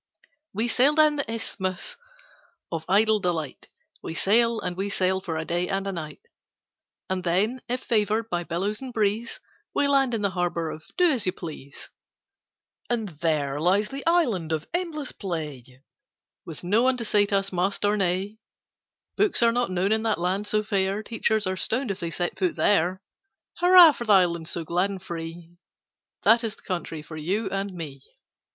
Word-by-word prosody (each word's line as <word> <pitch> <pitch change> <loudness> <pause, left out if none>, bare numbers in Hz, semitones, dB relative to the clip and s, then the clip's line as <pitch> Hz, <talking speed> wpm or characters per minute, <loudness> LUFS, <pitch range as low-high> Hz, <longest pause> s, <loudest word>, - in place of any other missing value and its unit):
We 220 +4 -1
sail 265 +5 +3
down 305 -1 +4
the 275 -5 -2
Isthmus 225 - -3 0.8
of 165 -2 -4
Idle 215 +2 +4
Delight— 165 -7 -3 0.3
We 160 - -6
sail 230 +5 +3
and 180 -3 -4
we 195 +2 -2
sail 190 -1 +1
for 165 -4 -4
a 160 - -3
day 175 +2 -1
and 195 +1 -2
a 195 - -2
night. 160 -5 -7 0.9
And 185 -1 -2
then, 200 +9 +1
if 250 +1 -2
favoured 215 0 +1
by 175 -4 -2
billows 190 +7 -2
and 260 -1 -6
breeze, 220 - -1 0.4
We 285 - +3
land 270 -3 +3
in 210 - -3
the 200 - +1
Harbour 175 -3 -1
of 155 - -9
Do 355 -2 +5
as 235 -9 -1
You - - +3
Please. 150 -6 -9 1.0
And 225 -4 -1
there 150 -3 -1
lies 195 +6 +2
the 275 +1 -6
Island 235 - +2
of 155 -1 -1
Endless 330 -6 -3
Play, 155 - -5 0.8
With 165 -1 -7
no 205 +6 +3
one 255 0 +2
to 235 - -4
say 205 -1 +3
to 200 - +2
us, 195 0 -2
Must, 190 +3 0
or 205 +1 +3
Nay. 195 +2 -1 0.8
Books 410 - +3
are 230 - +5
not 245 -1 0
known 185 +2 0
in 220 0 +2
that 220 -4 0
land 190 +4 -1
so 215 0 +1
fair, 200 0 0
Teachers 220 -1 0
are 185 0 -1
stoned 230 +4 0
if 195 - -5
they 170 - -3
set 175 +1 -3
foot 360 -3 +1
there. 185 -1 +2 0.6
Hurrah 355 -2 +9
for 240 - -6
the 215 - +4
Island, 170 -4 +3
so 170 0 -3
glad 175 +4 0
and 195 -1 -5
free, 170 0 -7 0.7
That 230 +2 +5
is 220 -1 -3
the - - -24
country 165 -4 -4
for 155 +1 -9
you 190 +6 -2
and 195 0 -2
me. 155 -7 -7
195 Hz, 185 wpm, -25 LUFS, 175-230 Hz, 1.0 s, Hurrah